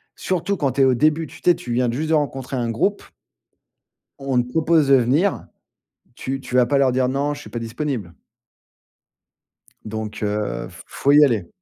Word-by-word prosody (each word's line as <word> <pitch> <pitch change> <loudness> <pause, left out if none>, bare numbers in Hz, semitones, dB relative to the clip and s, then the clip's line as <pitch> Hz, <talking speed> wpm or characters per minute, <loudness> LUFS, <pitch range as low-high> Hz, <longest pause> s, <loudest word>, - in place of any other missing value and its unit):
Surtout 190 +2 -2
quand 140 -4 0
tu 140 - +1
es - - +6
au 130 -1 +3
début, 155 +4 +2
tu - - -14
tu - - +4
es, 175 - +2
tu 120 - -8
viens 125 0 +1
de 115 - -1
juste 155 +5 -3
de - - +2
rencontrer 135 -3 -2
un 120 -2 -1
groupe 200 - 0 1.2
on 135 -2 +1
te 120 - -7
propose 160 0 +2
de 135 - +7
venir. 140 +10 +1 0.7
Tu 135 +2 -4
tu 125 - -9
vas 125 -1 +5
pas 140 +3 +2
leur 135 -2 +3
dire: 130 0 +1
«Non, 140 +3 -1
je - - -10
suis 105 - -12
pas 120 - -4
disponible» 115 - -4 1.7
donc, 110 0 -6
heu, 105 0 -2
f - - -14
faut 140 - 0
y 150 +1 +7
aller 110 -10 -1
135 Hz, 200 wpm, -21 LUFS, 120-150 Hz, 1.7 s, de